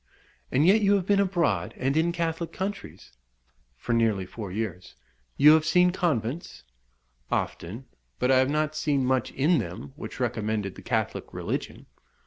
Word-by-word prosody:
"And 140 +4 +3
yet 205 +5 +5
you 205 0 +4
have 190 -3 0
been 200 0 +3
abroad, 185 -4 0
and 135 +2 0
in 165 +2 +2
Catholic 165 -1 -2
countries?" 200 +2 -6 0.7
"For 120 - -2
nearly 110 -5 +2
four 100 +1 -7
years." 90 - -5 0.4
"You 150 +2 +8
have 160 -1 +4
seen 180 +3 +4
convents?" 160 - -2 0.7
"Often; 110 +10 -3 0.3
but 125 - +1
I 130 - +5
have 130 +1 +2
not 155 +1 0
seen 145 -3 0
much 130 -1 +1
in 150 +4 +3
them 90 +5 -6
which 155 - -8
recommended 110 -5 -1
the - - -12
Catholic - - -2
religion." - - -4
140 Hz, 155 wpm, -26 LUFS, 115-170 Hz, 0.7 s, You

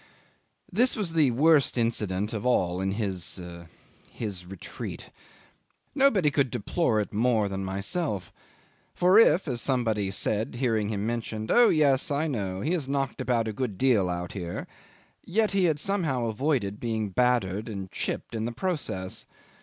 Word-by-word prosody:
'This 245 +7 +3
was 195 -7 -2
the 155 -5 +4
worst 145 +2 +3
incident 105 -3 -1
of 105 -2 -3
all 90 -8 +1
in 95 0 0
his 95 -4 -3 0.7
his 95 -6 -6
retreat. 95 -1 -8 0.8
Nobody 225 - +3
could 140 -3 +1
deplore 115 - 0
it 105 - -3
more 110 -1 +2
than 95 0 -4
myself; 100 - -3 0.6
for 185 +4 +5
if, 195 -6 +5
as 120 -4 -2
somebody 115 -7 0
said 105 +4 -1
hearing 115 -4 0
him 105 -1 -2
mentioned, 110 -2 -3
"Oh 240 -1 +6
yes! 140 -4 +3
I 145 +2 0
know. 100 -10 -3
He 150 - -1
has 155 -7 -1
knocked 135 -2 -1
about 115 -3 +1
a 110 - -3
good 110 -4 -3
deal 110 -8 +3
out 90 0 -3
here," 90 -3 -5 0.6
yet 215 +4 +1
he 195 -2 +2
had 160 -3 +2
somehow 155 -11 0
avoided 110 -3 -1
being 110 -3 -2
battered 110 -2 +1
and 95 -3 -6
chipped - - -4
in 110 -1 -2
the 120 - -2
process. 120 - -3
115 Hz, 155 wpm, -27 LUFS, 100-145 Hz, 0.8 s, Oh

